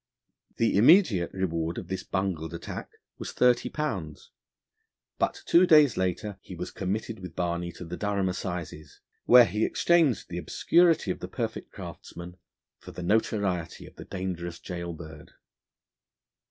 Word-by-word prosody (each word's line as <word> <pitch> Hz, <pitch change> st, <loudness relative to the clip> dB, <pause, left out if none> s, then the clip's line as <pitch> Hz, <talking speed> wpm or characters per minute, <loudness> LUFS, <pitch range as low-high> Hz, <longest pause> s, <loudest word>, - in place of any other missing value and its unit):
The 115 Hz, -, +2 dB
immediate 120 Hz, -, +5 dB
reward 85 Hz, -3 st, -2 dB
of 90 Hz, -, -6 dB
this 95 Hz, 0 st, -4 dB
bungled 85 Hz, -4 st, -3 dB
attack 85 Hz, -, -7 dB, 0.3 s
was -, -, -6 dB
thirty 125 Hz, -1 st, +3 dB
pounds, 95 Hz, -, -4 dB, 0.9 s
but -, -, -1 dB
two 180 Hz, +2 st, +5 dB
days 150 Hz, -, +6 dB
later 95 Hz, +2 st, -2 dB
he -, -, -10 dB
was -, -, -6 dB
committed 110 Hz, +4 st, -3 dB
with 90 Hz, -3 st, -9 dB
Barney 85 Hz, 0 st, -2 dB
to 90 Hz, -, -9 dB
the 85 Hz, +2 st, -6 dB
Durham 100 Hz, -2 st, 0 dB
Assizes, 90 Hz, -4 st, -5 dB, 0.3 s
where 125 Hz, -1 st, +8 dB
he 110 Hz, -1 st, -1 dB
exchanged 165 Hz, -9 st, +2 dB
the 90 Hz, 0 st, -4 dB
obscurity 165 Hz, -, +3 dB
of -, -, -5 dB
the -, -, -6 dB
perfect -, -, -5 dB
craftsman 85 Hz, +1 st, -9 dB, 0.4 s
for -, -, -12 dB
the 90 Hz, -, -7 dB
notoriety 100 Hz, -3 st, 0 dB
of -, -, -15 dB
the -, -, -10 dB
dangerous 90 Hz, -2 st, -5 dB
gaol 85 Hz, -1 st, -6 dB
bird. 80 Hz, -2 st, -11 dB
95 Hz, 145 wpm, -27 LUFS, 85-110 Hz, 0.9 s, where